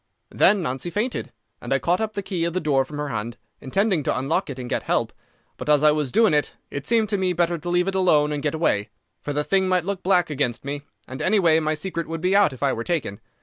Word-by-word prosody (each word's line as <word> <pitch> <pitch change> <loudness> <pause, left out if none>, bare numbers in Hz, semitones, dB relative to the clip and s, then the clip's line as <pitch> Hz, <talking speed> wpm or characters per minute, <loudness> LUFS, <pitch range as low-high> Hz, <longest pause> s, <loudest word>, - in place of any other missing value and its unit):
"Then 205 -4 +4
Nancy 135 +3 -3
fainted, 210 - -2 0.3
and 120 - -7
I 135 - +4
caught 175 - 0
up 220 -1 -2
the 200 -1 -4
key 180 -3 -2
of 170 - -2
the 185 - 0
door 140 -5 +2
from 145 +2 -8
her 150 -1 -3
hand, 115 0 -4 0.2
intending 190 +5 +1
to 135 - -1
unlock 145 +7 -1
it 135 - -6
and 125 -1 -6
get - - -1
help. - - -1 0.4
But - - -6
as 150 0 +4
I 150 - +7
was 150 -4 -1
doing 220 - +4
it 150 -1 0 0.2
it 140 0 -5
seemed 225 -2 +2
to 205 -2 0
me 185 -1 +1
better 170 0 0
to 175 +3 -5
leave 175 +1 +2
it 195 - -1
alone 155 -6 +3
and 145 -1 -2
get 150 +1 -1
away, 105 -10 0 0.3
for 145 - -4
the 150 +1 0
thing 190 +5 +1
might 180 -2 +1
look 200 -1 -3
black 180 -4 +2
against 135 -4 -2
me, 145 +1 -4 0.3
and 130 - -7
any 210 +3 +3
way 165 -4 +4
my 155 0 0
secret 170 +1 -4
would 165 0 -4
be 185 +4 +1
out 200 -6 +5
if 130 +1 -8
I 135 -2 +2
were 115 - -3
taken. 135 - -2
160 Hz, 270 wpm, -23 LUFS, 140-185 Hz, 0.4 s, I